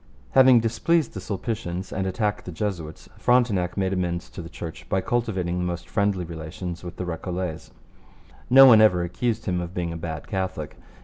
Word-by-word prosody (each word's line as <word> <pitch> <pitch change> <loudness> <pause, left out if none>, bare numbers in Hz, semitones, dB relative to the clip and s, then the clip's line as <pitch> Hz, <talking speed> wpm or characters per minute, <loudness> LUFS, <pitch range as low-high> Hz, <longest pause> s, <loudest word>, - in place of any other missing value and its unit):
Having 130 -3 +7
displeased 115 +9 +1
the 95 - -5
Sulpicians 95 -2 -4
and 95 0 -1
attacked 105 +2 -1
the 90 - -6
Jesuits, 80 -3 -5
Frontenac 105 -8 +2
made 95 -1 0
amends 85 -2 -2
to - - -7
the 85 - -9
Church 85 -2 -8
by 95 - +2
cultivating 95 -6 -1
the - - -1
most 85 0 -4
friendly 100 -4 0
relations 85 +2 -7
with 90 0 -7
the 90 - -4
Recollets. 90 -1 -4 0.8
No 135 +2 +9
one 115 -4 +8
ever 90 -5 +4
accused 110 +6 -2
him 90 -2 -1
of 85 +1 -7
being 85 -2 -2
a - - -5
bad 80 -1 -6
Catholic. 95 -6 -3
90 Hz, 180 wpm, -24 LUFS, 85-110 Hz, 0.8 s, No